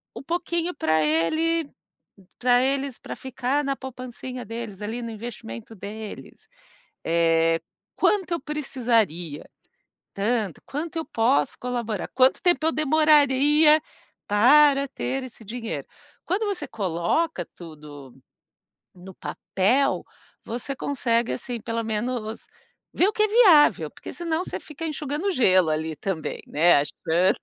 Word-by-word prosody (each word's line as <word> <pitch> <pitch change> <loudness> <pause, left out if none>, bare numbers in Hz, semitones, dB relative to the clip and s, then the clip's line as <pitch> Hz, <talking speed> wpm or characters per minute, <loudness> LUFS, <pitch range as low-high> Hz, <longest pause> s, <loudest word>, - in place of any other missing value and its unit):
um - - -7
pouquinho 345 +1 -2
pra 160 0 +2
ele 315 - +1 0.7
pra 245 0 +4
eles, 275 -1 -1
pra - - -7
ficar 265 +2 -2
na 275 0 -1
poupancinha 255 -1 -7
deles 225 -3 -7
ali, 225 +4 -4
no 230 - -5
investimento 215 - -8
deles. 210 +2 -9 0.6
Eh, 165 0 +3 0.4
quanto 385 -5 +1
eu 340 - 0
precisaria? 230 - -1 0.7
Tanto. 210 -3 -1
Quanto 305 +4 -5
eu 325 - -1
posso 240 +2 +1
colaborar? 235 -5 -3
Quanto 260 0 +4
tempo 350 -3 +2
eu 320 - +4
demoraria 300 0 +4 0.5
para 280 +6 +5
ter 265 0 -3
esse 235 -3 -12
dinheiro? 230 +2 -5 0.4
Quando 410 +5 -1
você 395 -3 -3
coloca 195 - -1
tudo 150 -5 -11 0.8
no 185 +1 -12
papel, 240 +13 0 0.4
você 245 +4 -4
consegue, 240 -4 0
assim, 245 -3 -5
pelo 230 +1 -3
menos 220 0 -3 0.5
ver 370 - +4
o - - 0
que 430 - +2
é - - +2
viável, 400 -10 +5
porque - - -10
senão 335 0 -2
você - - -4
fica 315 +2 -7
enxugando 305 +5 -2
gelo 185 - +4
ali 155 +1 -2
também, 190 -5 -4
né, 165 +1 +4
achando 170 +5 +1
245 Hz, 125 wpm, -24 LUFS, 195-300 Hz, 0.8 s, para